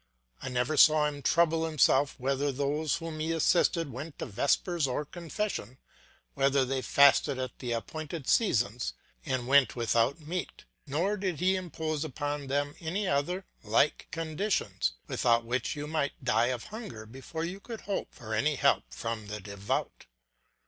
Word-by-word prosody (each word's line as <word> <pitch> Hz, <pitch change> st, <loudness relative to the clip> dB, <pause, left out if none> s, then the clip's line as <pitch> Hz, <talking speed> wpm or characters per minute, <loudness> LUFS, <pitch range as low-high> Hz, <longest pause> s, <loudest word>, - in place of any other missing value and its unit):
I -, -, -4 dB
never 125 Hz, +4 st, 0 dB
saw 155 Hz, +1 st, +7 dB
him 145 Hz, -1 st, -3 dB
trouble 165 Hz, +1 st, +3 dB
himself 145 Hz, -3 st, +3 dB
whether 135 Hz, +2 st, 0 dB
those 145 Hz, +3 st, 0 dB
whom 165 Hz, -2 st, -5 dB
he 160 Hz, +1 st, -1 dB
assisted 165 Hz, -1 st, +2 dB
went 140 Hz, +5 st, -7 dB
to -, -, -4 dB
vespers 145 Hz, -, +1 dB
or 130 Hz, +4 st, -2 dB
confession, 170 Hz, -, -4 dB, 0.6 s
whether 135 Hz, -1 st, +3 dB
they 130 Hz, 0 st, -1 dB
fasted 140 Hz, 0 st, +5 dB
at 130 Hz, -1 st, -5 dB
the 120 Hz, -2 st, -2 dB
appointed 155 Hz, +5 st, -5 dB
seasons 120 Hz, -, +2 dB, 0.3 s
and 130 Hz, -2 st, -1 dB
went 140 Hz, 0 st, +5 dB
without 120 Hz, +4 st, +1 dB
meat; 165 Hz, +4 st, -5 dB, 0.2 s
nor 175 Hz, +9 st, 0 dB
did 185 Hz, -5 st, -2 dB
he 185 Hz, +2 st, +3 dB
impose 160 Hz, -4 st, -3 dB
upon 145 Hz, -1 st, -3 dB
them 145 Hz, +1 st, 0 dB
any 185 Hz, +5 st, -2 dB
other 180 Hz, +6 st, 0 dB, 0.2 s
like 115 Hz, +7 st, +2 dB
conditions, 160 Hz, -, -1 dB
without 115 Hz, -1 st, +2 dB
which 125 Hz, +5 st, -1 dB
you 145 Hz, 0 st, -4 dB
might 150 Hz, -2 st, -2 dB
die 120 Hz, -1 st, +3 dB
of 125 Hz, -3 st, -2 dB
hunger 210 Hz, -, -7 dB
before 135 Hz, +8 st, -6 dB
you 185 Hz, +3 st, -5 dB
could 225 Hz, +1 st, -8 dB
hope 200 Hz, -, -3 dB
for 110 Hz, -2 st, -8 dB
any 145 Hz, +7 st, +2 dB
help -, -, +3 dB
from 110 Hz, -, -4 dB
the 105 Hz, 0 st, -5 dB
devout. 100 Hz, 0 st, -4 dB
145 Hz, 155 wpm, -30 LUFS, 125-165 Hz, 0.6 s, saw